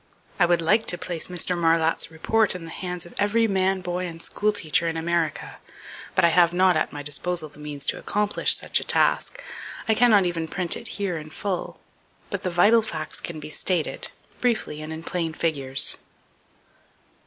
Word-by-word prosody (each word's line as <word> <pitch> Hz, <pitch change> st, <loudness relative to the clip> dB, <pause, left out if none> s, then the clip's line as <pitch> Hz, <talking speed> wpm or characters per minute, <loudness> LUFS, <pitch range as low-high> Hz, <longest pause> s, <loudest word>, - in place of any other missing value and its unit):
I 175 Hz, -, +5 dB
would 170 Hz, -1 st, +2 dB
like 215 Hz, +7 st, +2 dB
to 175 Hz, -, +2 dB
place 175 Hz, -3 st, -3 dB
Mr. 180 Hz, 0 st, +1 dB
Marlatt's 165 Hz, -1 st, +1 dB
report 205 Hz, +6 st, +1 dB
in 175 Hz, -2 st, -7 dB
the 165 Hz, -, -9 dB
hands 180 Hz, -1 st, -4 dB
of 175 Hz, -, -13 dB
every 220 Hz, +3 st, +2 dB
man, 190 Hz, -1 st, +1 dB
boy 180 Hz, 0 st, -3 dB
and 165 Hz, -1 st, -9 dB
school 210 Hz, +5 st, -1 dB
teacher 170 Hz, -4 st, 0 dB
in 165 Hz, 0 st, -2 dB
America; 165 Hz, -1 st, -2 dB, 0.6 s
but 185 Hz, -, +4 dB
I -, -, +5 dB
have 175 Hz, +1 st, +3 dB
not 185 Hz, -1 st, +4 dB
at 155 Hz, -, 0 dB
my 145 Hz, -1 st, -7 dB
disposal 155 Hz, +3 st, -2 dB
the 145 Hz, -, -18 dB
means 145 Hz, -2 st, -5 dB
to -, -, -1 dB
accomplish 210 Hz, 0 st, +3 dB
such -, -, 0 dB
a -, -, -5 dB
task. -, -, +1 dB, 0.4 s
I 220 Hz, -, +4 dB
cannot 215 Hz, -4 st, +4 dB
even 170 Hz, -2 st, -2 dB
print 175 Hz, +1 st, 0 dB
it -, -, -3 dB
here 190 Hz, -5 st, -2 dB
in 155 Hz, 0 st, -10 dB
full, 190 Hz, +3 st, -4 dB, 0.5 s
but 200 Hz, -3 st, -3 dB
the 185 Hz, -, -2 dB
vital 205 Hz, +7 st, +4 dB
facts 155 Hz, -8 st, -4 dB
can 170 Hz, -2 st, -6 dB
be 155 Hz, -, -8 dB
stated, 175 Hz, 0 st, -1 dB, 0.3 s
briefly 220 Hz, -11 st, -1 dB
and 155 Hz, +1 st, -7 dB
in 160 Hz, +1 st, -7 dB
plain 165 Hz, -2 st, -3 dB
figures. 140 Hz, -5 st, +2 dB
175 Hz, 190 wpm, -24 LUFS, 160-190 Hz, 0.6 s, I